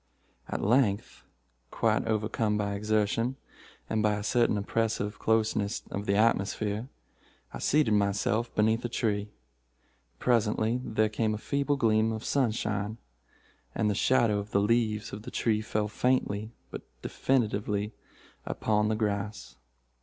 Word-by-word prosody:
"At - - -3
length, 105 -2 +1 0.4
quite - - +1
overcome 110 0 0
by 100 -1 -1
exertion, 110 +4 0 0.5
and 110 - 0
by 105 0 +2
a 105 - -4
certain 115 0 +2
oppressive 105 0 -1
closeness 110 -2 +1
of 100 +1 -4
the 100 - +2
atmosphere, 105 +1 +1 0.7
I - - -6
seated 150 -6 +2
myself 105 +3 +1
beneath 110 +2 +2
a 120 - -2
tree. 105 -3 -1 0.9
Presently 115 0 +1
there 110 -2 +1
came 110 0 0
a - - -4
feeble 140 +5 0
gleam 110 -2 +3
of 110 0 -5
sunshine, 110 -5 0 0.8
and 105 -1 +1
the - - +1
shadow 115 -1 +3
of 100 +1 -6
the 100 - +2
leaves 110 0 +1
of 100 - -6
the - - -8
tree 110 -2 0
fell 110 -1 -1
faintly 110 -2 0 0.2
but - - -6 0.2
definitely 105 -4 0 0.5
upon 105 -1 0
the 110 - +1
grass. 105 - -3
110 Hz, 135 wpm, -29 LUFS, 105-115 Hz, 0.9 s, gleam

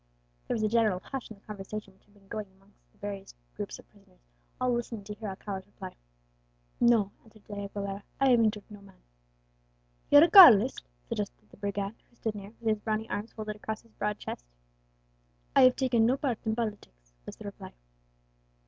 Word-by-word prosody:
There - - 0
was 220 - -1
a - - +3
general 215 -4 +2
hush 270 -3 -6
in 220 - -9
the 195 - -28
conversation 210 -1 -7
which 190 - -30
had 205 - -27
been 195 -1 -23
going 210 +1 -5
on 190 - -28
amongst 195 +1 -29
the - - -31
various 200 -1 -7 0.2
groups - - -5
of - - -17
prisoners, - - -24 0.4
all 250 -1 +2
listening 235 -3 -3
to 210 +1 -7
hear 215 +1 -7
Alcala's 190 0 -6
reply. - - -10 0.8
"No," 230 -4 +4
answered 215 -2 -20
De 210 - -10
Aguilera, 200 0 -4 0.2
"I 270 -1 +5
have 240 - +6
injured 215 -2 +2
no 205 -1 -11
man." 195 -1 -18 1.1
"You're 290 +1 +9
a - - +6
Carlist?" 260 - +9 0.3
suggested - - -4
the - - -16
brigand, 200 0 -3 0.2
who 240 - -28
stood 220 -2 -3
near, 200 -1 -8
with 230 - -6
his 215 -1 +1
brawny 220 +1 -2
arms 210 +3 -4
folded 215 -1 -5
across 215 +1 -5
his 230 - -24
broad 210 0 -2
chest. - - -6 1.1
"I - - +7
have 255 - +6
taken 240 -4 +3
no 255 +3 +2
part 260 -6 -1
in 220 - +1
politics," 130 - -5
was - - -7
the - - -12
reply. - - -8
210 Hz, 200 wpm, -29 LUFS, 200-230 Hz, 1.1 s, You're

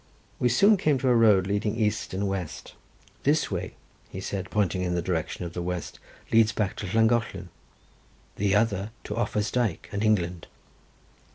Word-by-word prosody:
We 125 - +3
soon 200 - +5
came 155 -6 +2
to 130 0 0
a 125 - +5
road 105 -5 +5
leading 105 +2 -1
east 110 -2 -1
and 100 +2 -1
west. 95 -5 -5 0.5
"This 145 -2 +1
way," 90 -1 -4 0.4
said 95 0 -4
he, - - -15
pointing 95 -3 0
in 90 -1 -1
the 85 - 0
direction 85 0 -2
of 85 - -7
the 90 - -4
west, 90 0 -4 0.3
"leads 110 -1 +5
back 105 -4 -1
to 100 - -4
Llangollen, 110 -3 +1 0.9
the 100 -1 +1
other 105 -2 +1
to 105 - -5
Offa's 105 -3 -1
Dyke 120 -9 -1
and 100 0 -2
England." 90 -6 0
100 Hz, 170 wpm, -26 LUFS, 90-115 Hz, 0.9 s, soon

